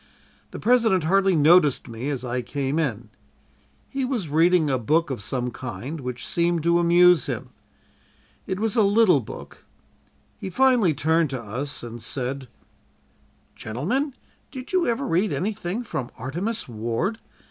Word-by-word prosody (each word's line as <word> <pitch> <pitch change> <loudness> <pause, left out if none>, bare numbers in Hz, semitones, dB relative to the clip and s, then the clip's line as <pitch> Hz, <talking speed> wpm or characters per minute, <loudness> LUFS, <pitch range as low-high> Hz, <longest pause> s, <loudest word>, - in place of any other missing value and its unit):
The - - -8
President 225 -6 +3
hardly 195 +2 +3
noticed 150 -3 +4
me 115 +4 -5
as 130 -3 -3
I 125 +1 -2
came 140 +3 -2
in. 120 -7 -2 0.8
He 270 -1 -3
was 245 - -2
reading 165 +2 +4
a 130 -3 +1
book 155 +6 +1
of 125 - -4
some 125 +2 -2
kind 130 +5 -6
which 125 -1 -5
seemed 170 -1 0
to 170 +1 +3
amuse 175 -2 +5
him. - - -4 1.0
It 190 0 -2
was 225 +1 0
a 225 - +4
little 205 -5 +5
book. 115 - -10 0.8
He - - -5
finally 245 - +3
turned 160 +2 +2
to 130 -1 -4
us 120 +7 -5
and 120 0 -8
said: 130 +2 -4 1.1
"'Gentlemen, 245 - -2 0.3
did 260 +5 -9
you 370 -2 +2
ever 240 +4 0
read 190 0 +1
anything 205 +2 -2
from 130 - -4
"Artemus 175 - -3
Ward?" 120 - -2
165 Hz, 145 wpm, -24 LUFS, 130-200 Hz, 1.1 s, amuse